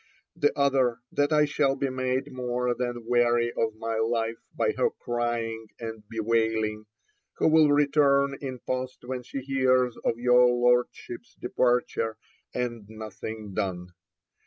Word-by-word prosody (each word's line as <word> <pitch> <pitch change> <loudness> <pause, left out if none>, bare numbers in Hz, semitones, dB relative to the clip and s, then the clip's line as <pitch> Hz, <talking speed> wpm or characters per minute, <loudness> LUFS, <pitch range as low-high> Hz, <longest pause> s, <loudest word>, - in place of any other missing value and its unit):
The 145 -3 +2
other, 135 -4 +2
that 145 +1 +1
I 150 -1 +5
shall 145 -2 +1
be 135 -1 -1
made 130 +2 -1
more 125 -1 -1
than 120 -1 -4
weary 120 0 +2
of 110 -1 0
my 115 0 -3
life 115 0 0 0.2
by - - +1
her - - +1
crying 115 -2 -3
and 110 -2 -6
bewailing, 110 -1 0 0.5
who - - +2
will 155 -2 +5
return 140 -1 +3
in 130 -2 -4
post 130 0 -3
when 125 0 -4
she 135 +2 -6
hears 130 -2 +2
of 115 - 0
your 125 +1 +5
Lordship's 120 -1 0
departure, 120 -3 0 0.3
and 120 -4 -4
nothing 110 -1 -7
done. 90 -3 -3
120 Hz, 135 wpm, -27 LUFS, 115-130 Hz, 0.5 s, I